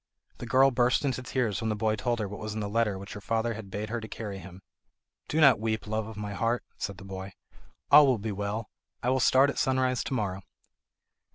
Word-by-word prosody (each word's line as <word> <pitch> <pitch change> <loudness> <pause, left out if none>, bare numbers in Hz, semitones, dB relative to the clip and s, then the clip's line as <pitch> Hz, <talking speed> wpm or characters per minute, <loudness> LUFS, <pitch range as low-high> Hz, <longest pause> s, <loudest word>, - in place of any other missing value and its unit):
The 120 - -6
girl 135 +3 +5
burst 125 +2 +2
into 130 -2 -1
tears 120 -5 -1
when 110 - -1
the 110 - 0
boy 110 +1 +1
told 120 +3 -1
her 105 -3 -2
what 100 +1 -8
was 105 0 -5
in - - -2
the 105 - -2
letter 105 -2 +1
which 100 +1 -8
her 105 - -8
father 115 +2 0
had 110 -3 -8
bade 105 +3 -4
her 120 -1 -2
to 110 - -7
carry 105 -3 -6
to - - -9
him. 95 +1 -12 0.6
"Do 155 - 0
not 140 -7 +7
weep, 110 0 -2
love 110 0 -2
of 110 -2 -9
my 105 -1 -4
heart," 115 +3 0
said 100 -1 -5
the 95 - -11
boy, 95 0 -7 0.6
"all 145 0 +9
will 130 -3 +3
be 110 +1 -4
well. 105 +2 -4 0.3
I 125 - +2
will 130 - +2
start 135 +2 +5
at - - -5
sunrise 130 -1 +1
to 135 - -2
morrow." 100 -5 -2
110 Hz, 245 wpm, -28 LUFS, 105-125 Hz, 0.6 s, all